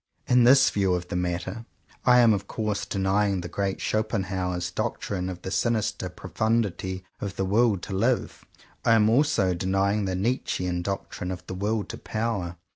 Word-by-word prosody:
In 125 -1 +4
this 135 +2 +6
view 95 -3 +2
of 90 0 -5
the - - -3
matter 90 +5 -2 0.4
I 125 -1 +7
am 115 -2 +6
of 100 -1 -3
course 105 -2 -2
denying 100 0 +1
the 85 - -5
great 95 +3 -2
Schopenhauer's 95 -5 -1
doctrine 90 +1 -3
of 90 -1 -7
the 95 - -4
sinister 115 -3 0
profundity 95 -4 -2
of 100 -1 -4
the 95 - -1
"Will 105 +2 +3
to 95 +2 -7
live." 115 +6 0 0.4
I 115 - +4
am 110 -1 +4
also 115 -8 +3
denying 95 +3 +1
the 95 -1 -1
Nietzschean 90 -4 -1
doctrine 95 -1 -4
of 90 -1 -6
the - - -6
"Will 105 +3 -1
to - - -8
Power." 105 -6 -3
100 Hz, 170 wpm, -26 LUFS, 90-110 Hz, 0.4 s, I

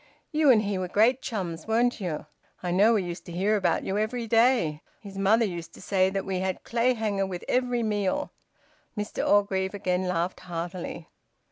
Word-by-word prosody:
"You 305 -2 +3
and 220 -4 +6
he 200 -2 -1
were 185 - -2
great 230 +8 +3
chums, 175 -8 -4
weren't 235 +1 +1
you? 165 -6 -3 0.4
I 175 - -1
know 205 +6 +5
we 200 - +1
used 175 0 -6
to - - -7
hear 195 +5 +1
about 190 -4 +1
you 195 +2 -1
every 230 +2 -2
day. 225 - +3 0.2
His 200 -2 -11
mother 210 +4 +3
used 170 -4 -6
to - - -13
say 190 0 +2
that 195 0 -3
we 190 -1 -2
had 190 0 -2
Clayhanger 225 -5 0
with 180 -2 -6
every 245 -1 +1
meal." 210 +6 -1 0.7
Mr 210 0 -3
Orgreave 200 -1 +2
again 185 -1 -1
laughed 180 0 -1
heartily. 170 -1 -6
195 Hz, 180 wpm, -27 LUFS, 180-225 Hz, 0.7 s, and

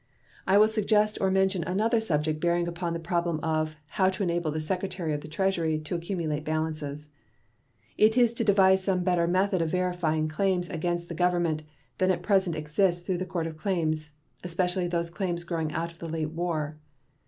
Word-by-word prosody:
I 190 +2 +5
will 215 +1 +7
suggest 215 -1 +2
or 190 - +3
mention 190 -1 +2
another 215 +7 +1
subject 155 -7 0
bearing 170 +1 +1
upon 170 0 -3
the 170 - -3
problem 170 -1 -1
of 155 -1 0
"how 185 +4 +2
to 190 +1 -2
enable 170 -2 0
the 155 +1 -2
Secretary 180 0 -2
of 145 - -3
the 155 - -9
Treasury 165 -1 0
to 155 - -5
accumulate 170 -3 -2
balances." 155 -2 -3 0.9
It 220 +3 +5
is 240 -2 +5
to 230 - -1
devise 190 -2 +4
some 185 -2 +1
better 175 -2 +2
method 185 +1 +2
of 165 - 0
verifying 175 -3 0
claims 180 +2 0
against 175 +1 -2
the 170 - -6
Government 175 -2 +1 0.4
than 185 - +3
at 175 -2 0
present 190 -4 +2
exists 175 +4 0
through 180 -2 -1
the 185 - -3
Court 170 -3 -2
of 160 -1 -6
Claims, 155 -5 -1 0.3
especially 180 +1 0
those 170 -1 -2
claims 175 -2 -2
growing 165 -3 -2
out 170 +2 -2
of 165 - -21
the 165 - -6
late 155 -1 -2
war. 155 -3 -3
175 Hz, 190 wpm, -27 LUFS, 160-190 Hz, 0.9 s, will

